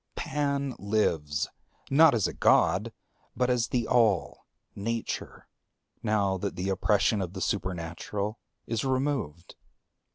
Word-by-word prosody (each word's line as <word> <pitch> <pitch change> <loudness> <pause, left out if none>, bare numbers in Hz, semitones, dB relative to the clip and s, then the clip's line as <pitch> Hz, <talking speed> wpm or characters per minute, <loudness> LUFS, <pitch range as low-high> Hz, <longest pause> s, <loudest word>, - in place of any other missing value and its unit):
Pan 140 -1 -1
lives, 80 -9 0 0.4
not 150 0 +7
as 110 - +1
a - - -5
God, - - +3 0.5
but 125 0 +2
as 120 -2 +1
the 120 -3 -1
All, 110 -7 +2 0.3
Nature, 115 +3 -4 0.5
now 100 -3 +1
that 100 +2 -3
the 95 +2 -2
oppression 100 +2 +2
of 90 -1 -4
the 95 - -5
Supernatural 95 +3 -3 0.3
is 115 -2 -2
removed. 130 - -2
105 Hz, 120 wpm, -28 LUFS, 95-125 Hz, 0.5 s, not